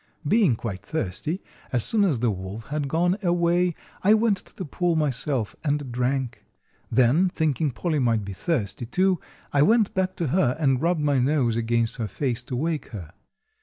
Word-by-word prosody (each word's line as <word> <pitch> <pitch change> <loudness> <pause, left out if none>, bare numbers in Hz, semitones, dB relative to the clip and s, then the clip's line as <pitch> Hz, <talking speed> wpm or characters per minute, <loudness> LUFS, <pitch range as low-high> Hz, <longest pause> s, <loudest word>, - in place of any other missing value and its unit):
Being 195 - +4
quite 100 -5 -5
thirsty, 155 - -3 0.3
as 120 -3 +1
soon 215 -2 +2
as 140 - 0
the 120 -2 +2
wolf 95 +4 -7
had 145 -1 -2
gone 175 +6 +1
away 175 -1 +2 0.3
I 210 +3 +5
went 220 -2 +2
to - - -10
the 185 - -5
pool 175 +3 0
myself 135 -5 0
and 145 -4 -1
drank. 125 +1 -2 0.5
Then, 130 +10 +4
thinking 155 -3 0
Polly 155 +4 -1
might 115 -5 +1
be 100 - -6
thirsty, 120 - -2
too, 185 +6 +2 0.3
I 140 - +4
went 220 +6 +4
back 185 0 -1
to 165 -5 -2
her 140 -5 +2
and 135 -4 +2
rubbed 170 -1 +1
my 145 -2 +2
nose 125 -3 +2
against 115 0 0
her 115 - -2
face 125 +2 -2
to 125 - -4
wake 155 +2 -2
her. 90 -7 -9
145 Hz, 180 wpm, -25 LUFS, 120-175 Hz, 0.5 s, I